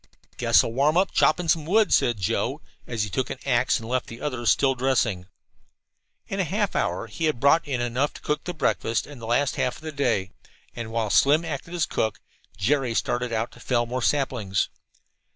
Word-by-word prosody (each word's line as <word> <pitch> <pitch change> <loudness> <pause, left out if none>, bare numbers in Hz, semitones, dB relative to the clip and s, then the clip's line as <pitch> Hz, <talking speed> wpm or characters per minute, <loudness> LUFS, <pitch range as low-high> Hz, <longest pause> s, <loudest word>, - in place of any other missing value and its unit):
"Guess - - +4
I'll - - -3
warm 145 +6 +2
up 190 +1 +2
chopping 175 -1 +2
some 160 -1 +2
wood," 215 +4 +3
said 120 -3 +3
Joe, 95 - -1 0.3
as 115 -3 -1
he 105 - -3
took 130 +6 -1
an - - -4
axe 125 -2 +2
and 115 - -9
left 130 +1 -1
the 115 - -9
others 125 -6 -1
still 135 -1 +3
dressing. 120 -8 0 1.0
In 195 - -4
half 195 +3 0
an - - +2
hour - - -2
he 165 - -4
had 155 -6 0
brought 140 +4 +4
in 130 -4 -1
enough 125 +4 0
to - - -10
cook 150 - -2
the 180 - -3
breakfast 115 -6 0
and 145 -5 -12
last 120 +5 0
half 125 - -1
the 155 0 -6
day, 120 -9 0 0.4
and 115 -2 -6
while 115 -2 -1
Slim 150 +4 +4
acted 160 +2 -5
as 170 - +1
cook, 110 - -2 0.4
Jerry 125 +3 +1
started 125 +1 -1
out 115 +1 -1
to - - -16
fell 120 -2 0
more 125 +2 -3
saplings. 120 -9 0
130 Hz, 200 wpm, -25 LUFS, 115-150 Hz, 1.0 s, Guess